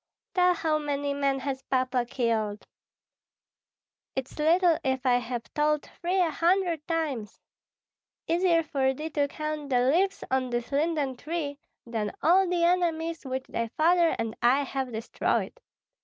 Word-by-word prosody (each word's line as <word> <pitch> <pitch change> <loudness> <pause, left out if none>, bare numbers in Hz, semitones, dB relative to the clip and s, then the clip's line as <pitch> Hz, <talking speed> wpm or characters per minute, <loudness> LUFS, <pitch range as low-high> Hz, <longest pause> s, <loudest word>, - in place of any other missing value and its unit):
"Tell 360 -1 +4
how 315 -2 0
many 285 -1 -2
men 280 -1 +1
has 265 -1 -3
Papa 255 -2 0
killed?" 220 -4 -1 1.5
"It's 265 +3 -5
little 335 +2 +4
if 260 0 -1
I 245 -1 +4
have 240 -1 -4
told 300 0 +1 0.2
thee 360 +2 +1
a 350 -4 +3
hundred 340 -1 +1
times! 295 -10 -2 0.9
Easier 335 0 +3
for 265 -3 0
thee 310 +3 -5
to 290 -1 +1
count 305 0 -4
the 250 -2 +3
leaves 385 +5 +1
on 260 -1 +1
this 240 +1 -3
linden 290 -3 0
tree 295 -1 -4 0.3
than 220 -3 -3
all 365 +3 +5
the 350 -1 +1
enemies 335 -3 +1
which 260 0 -3
thy 230 0 -2
father 340 +1 +4
and 225 -1 -3
I 260 +4 +4
have 265 -2 -3
destroyed. 225 +1 -1
285 Hz, 145 wpm, -27 LUFS, 255-330 Hz, 1.5 s, all